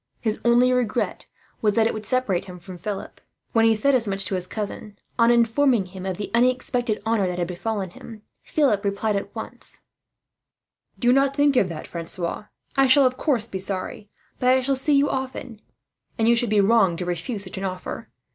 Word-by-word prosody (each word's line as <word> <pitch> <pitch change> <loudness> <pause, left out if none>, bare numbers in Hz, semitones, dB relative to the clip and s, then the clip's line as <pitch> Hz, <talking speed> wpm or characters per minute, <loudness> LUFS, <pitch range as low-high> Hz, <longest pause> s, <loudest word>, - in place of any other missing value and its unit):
His 220 -2 -2
only 240 +1 +4
regret 245 -2 -1 0.3
was 210 -2 +2
that 225 - +4
it 225 - +1
would 215 -1 -6
separate 255 -9 0
him 180 -1 -9
from 180 +1 -10
Philip. 200 +1 -6 0.3
When 225 -1 +4
he 225 0 +5
said 275 +6 +2
as 240 -4 +2
much 195 0 -1
to 185 - -4
his 180 -1 -2
cousin, 210 -1 -6 0.2
on 230 0 +5
informing 235 -1 +3
him 185 +1 -8
of 185 -2 -3
the 205 - -5
unexpected 245 -2 +1
honour 220 -4 +1
that 180 -1 -3
had 175 -1 -1
befallen 190 +1 -3
him, 215 +3 -12 0.2
Philip 265 -10 +1
replied 200 +1 0
at 200 - -4
once: - - -7 1.2
"Do 245 0 +3
not 275 +1 +2
think 285 -1 +3
of 195 -7 +3
that, 160 -2 -6
Francois. 170 +3 -4 0.3
I 270 -1 +4
shall 270 +1 +6
of 255 0 +2
course 250 -8 0
be 190 - -5
sorry; 195 +2 -4 0.3
but 250 - +2
I 260 0 +4
shall 270 +2 0
see 270 +3 +1
you 280 +1 +4
often, 260 -4 -5 0.6
and 225 -1 +2
you 235 - +5
would 240 - -2
be 210 -1 +4
wrong 195 -4 +3
to 180 - -4
refuse 180 +5 -4
such 190 0 -7
an - - -5
offer. 185 -1 -5
220 Hz, 205 wpm, -23 LUFS, 195-250 Hz, 1.2 s, shall